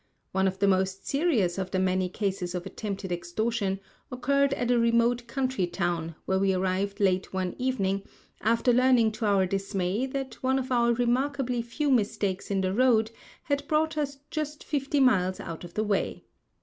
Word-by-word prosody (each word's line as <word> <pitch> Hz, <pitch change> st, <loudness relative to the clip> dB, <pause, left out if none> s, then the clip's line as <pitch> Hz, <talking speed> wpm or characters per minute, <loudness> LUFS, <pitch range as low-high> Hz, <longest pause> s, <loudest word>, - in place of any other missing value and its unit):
One 190 Hz, 0 st, +2 dB
of 190 Hz, 0 st, -2 dB
the 200 Hz, +1 st, +2 dB
most 190 Hz, 0 st, +1 dB
serious 255 Hz, -, +1 dB
of 190 Hz, -1 st, -3 dB
the 185 Hz, -, -1 dB
many 185 Hz, 0 st, +1 dB
cases 185 Hz, -2 st, -2 dB
of 175 Hz, -, -4 dB
attempted 200 Hz, -3 st, -5 dB
extortion 195 Hz, +3 st, -1 dB, 0.3 s
occurred 280 Hz, +2 st, +2 dB
at 245 Hz, 0 st, 0 dB
a 245 Hz, -, +4 dB
remote 235 Hz, +1 st, +2 dB
country 255 Hz, -6 st, -1 dB
town, 170 Hz, -2 st, -2 dB
where 190 Hz, 0 st, +1 dB
we 195 Hz, -1 st, +2 dB
arrived 190 Hz, +2 st, -1 dB
late 190 Hz, -2 st, +1 dB
one 185 Hz, -1 st, -2 dB
evening, 200 Hz, -7 st, 0 dB, 0.4 s
after 230 Hz, +3 st, +3 dB
learning 250 Hz, -2 st, +4 dB
to 215 Hz, 0 st, -2 dB
our 195 Hz, -2 st, +3 dB
dismay 195 Hz, +4 st, -1 dB
that 265 Hz, -2 st, -5 dB
one 260 Hz, +1 st, +2 dB
of 260 Hz, 0 st, -3 dB
our 235 Hz, -1 st, +3 dB
remarkably 250 Hz, +1 st, 0 dB
few 275 Hz, +5 st, -1 dB
mistakes 200 Hz, -5 st, 0 dB
in 195 Hz, -1 st, +1 dB
the 185 Hz, 0 st, 0 dB
road 225 Hz, -1 st, +3 dB, 0.3 s
had 285 Hz, 0 st, -1 dB
brought 315 Hz, +1 st, +1 dB
us 285 Hz, -2 st, -2 dB
just 300 Hz, -1 st, -4 dB
fifty 285 Hz, 0 st, -1 dB
miles 190 Hz, -8 st, +3 dB
out 165 Hz, 0 st, -7 dB
of 175 Hz, -1 st, -10 dB
the 215 Hz, -, +1 dB
way. 205 Hz, -2 st, -1 dB
215 Hz, 175 wpm, -27 LUFS, 190-255 Hz, 0.4 s, a